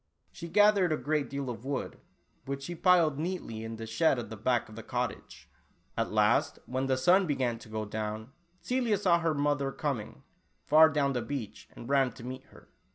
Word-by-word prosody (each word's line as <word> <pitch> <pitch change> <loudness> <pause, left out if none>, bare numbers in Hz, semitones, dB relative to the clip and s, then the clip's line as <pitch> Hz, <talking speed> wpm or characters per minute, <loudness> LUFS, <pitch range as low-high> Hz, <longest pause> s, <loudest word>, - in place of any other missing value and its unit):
She 170 - -8
gathered 205 -1 +4
a 155 - +1
great 150 -1 -1
deal 140 -1 -4
of 115 - -9
wood, 140 0 -4 0.5
which 140 0 -4
she 175 - -5
piled 170 -5 +3
neatly 155 -10 -4
in 115 0 -5
the 115 0 -7
shed 135 +6 +2
at 120 - -6
the - - -5
back 120 +3 0
of 110 - -13
the 115 - -7
cottage. - - -5 0.5
At - - -1
last, - - +2
when 130 +1 -2
the 130 -1 +1
sun 180 +8 +4
began 130 -5 -1
to 115 - -14
go 110 0 -3
down, 110 +2 -5 0.3
Celia 245 -4 0
saw 180 -4 +3
her 165 -2 0
mother 145 -1 0
coming, 135 -7 -4 0.4
far 155 +2 +7
down 140 -3 +1
the 125 - -1
beach, 125 -5 -6
and 115 - -9
ran 135 -2 +3
to 115 - -12
meet 130 +1 -7
her. - - -18
140 Hz, 200 wpm, -30 LUFS, 120-160 Hz, 0.5 s, far